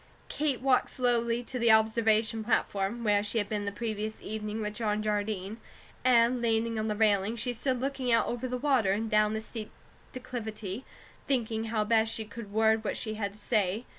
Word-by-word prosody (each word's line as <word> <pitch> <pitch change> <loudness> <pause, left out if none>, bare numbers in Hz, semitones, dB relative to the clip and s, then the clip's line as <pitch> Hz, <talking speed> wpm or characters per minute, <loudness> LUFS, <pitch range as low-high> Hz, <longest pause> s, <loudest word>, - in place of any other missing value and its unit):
Kate 290 -5 -1
walked 260 -1 +3
slowly 240 -1 0
to 250 +1 -5
the 235 -1 +5
observation 220 0 +3
platform, 215 0 0
where 205 -2 +3
she 210 +2 -1
had 205 -2 +1
been 205 -1 -2
the 200 - -2
previous 215 0 -4
evening 215 0 -4
with 210 -1 -3
John 215 -1 -1
Jardine; 210 -1 -2 0.5
and 245 0 +4
leaning 230 -1 +1
on 215 - -1
the 210 - -1
railing, 210 0 +2
she 245 +2 -2
stood 255 +2 -1
looking 265 -1 -1
out 230 - +4
over 245 +2 -3
the 250 0 -2
water, 250 -8 +2
and 220 +2 -2
down 215 0 +3
the 220 - -2
steep 220 -1 -7 0.4
declivity, 225 -3 -6 0.4
thinking 225 -4 0
how 220 -1 0
best 220 +1 +2
she 220 - -3
could 215 -1 -9
word 220 +1 +3
what - - -2
she 215 - -4
had 200 -2 -3
to - - -16
say. 210 +1 0
220 Hz, 195 wpm, -29 LUFS, 210-235 Hz, 0.5 s, the